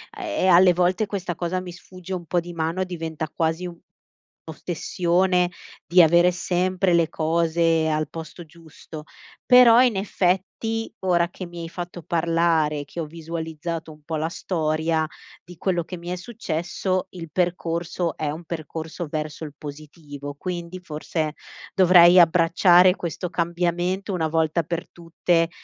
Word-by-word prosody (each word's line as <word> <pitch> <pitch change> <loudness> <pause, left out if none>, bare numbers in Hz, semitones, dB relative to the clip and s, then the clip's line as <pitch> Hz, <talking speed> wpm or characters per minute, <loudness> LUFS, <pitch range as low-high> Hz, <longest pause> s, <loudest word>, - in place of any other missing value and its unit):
e 330 - -2
alle 180 0 +6
volte 180 +4 +1
questa 190 -3 -3
cosa 175 +2 -2
mi 180 -1 -7
sfugge 185 +1 -10
un 175 -2 -5
po' 175 - +1
di 175 0 -7
mano 165 +2 -2
e 185 - 0
diventa 160 -3 -5
quasi 165 +2 -1 0.8
un'ossessione 175 +2 0 0.4
di 180 +1 +6
avere 175 +2 +5
sempre 180 +1 0
le 170 -2 +3
cose 165 0 +1
al 155 0 -1
posto 165 +1 -9
giusto. 160 -1 -12 0.4
Però 250 -2 +8
in 250 -4 +3
effetti, 195 +4 -1
ora 175 -2 +2
che 185 +1 -8
mi 175 0 -9
hai 165 - -6
fatto 175 0 -7
parlare, 165 -3 +1
che 170 - -9
ho 165 - -2
visualizzato 165 0 -6
un 150 0 -15
po' 160 +1 -4
la 155 +1 -1
storia 160 -2 -1 0.4
di 180 +1 -13
quello 175 -1 0
che 180 - -7
mi 170 +1 -8
è 180 - -2
successo, 185 -2 -3
il 165 -4 -9
percorso 170 -1 -1
è 150 -2 -2
un 160 +3 -7
percorso 160 +1 -6
verso 155 +1 -4
il 150 - -9
positivo. 145 -1 -9
Quindi 175 +1 -5
forse 155 -1 -3 0.4
dovrei 180 -1 +7
abbracciare 175 +2 +5
questo 170 +1 -4
cambiamento 175 +3 -1
una 165 -3 0
volta 160 +1 +1
per 170 +1 -4
tutte 165 0 0
170 Hz, 145 wpm, -23 LUFS, 160-180 Hz, 0.8 s, Però